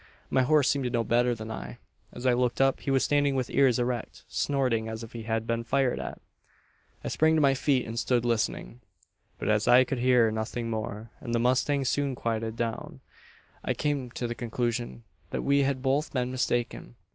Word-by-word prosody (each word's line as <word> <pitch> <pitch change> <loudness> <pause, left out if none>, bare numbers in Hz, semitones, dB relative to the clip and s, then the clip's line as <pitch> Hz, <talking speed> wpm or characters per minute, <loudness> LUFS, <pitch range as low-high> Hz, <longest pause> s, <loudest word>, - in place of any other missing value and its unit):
"My 130 - +4
horse 145 +1 +3
seemed 140 -1 +1
to - - 0
know 120 -2 0
better 120 +1 +2
than 110 0 -7
I. 60 - -7 0.3
As 120 - -8
I 125 - +4
looked 125 0 0
up, 135 0 +3
he - - -5
was 135 -1 +3
standing 145 -1 +2
with 130 -2 -2
ears 130 -4 +4
erect, 120 -2 -3
snorting, 115 +3 0
as 110 +1 -6
if 115 - -10
he 115 - -6
had 110 0 0
been 115 0 -1
fired 130 +2 +1
at! - - -6 0.8
"I - - -4
sprang 160 +1 +3
to 155 - +3
my 140 -2 +5
feet, 135 -1 +1
and 115 +1 -4
stood 120 -1 +1
listening. 120 +1 -1 0.6
"But - - -4
as 105 0 +2
I 125 +1 +7
could 130 0 -3
hear 125 -3 +4
nothing 115 +2 -3
more, 110 0 -5
and 120 -2 -3
the - - +2
mustang 130 +3 +2
soon 140 +1 0
quieted 115 -1 -2
down, 115 -1 -4 0.6
I - - -1
came 145 -4 -1
to 125 - -3
the 120 - -2
conclusion 120 0 -3 0.3
that - - -3
we 140 0 +3
had 135 -2 0
both 140 +3 0
been 125 -2 -1
mistaken. 120 - -2
125 Hz, 205 wpm, -28 LUFS, 115-135 Hz, 0.8 s, I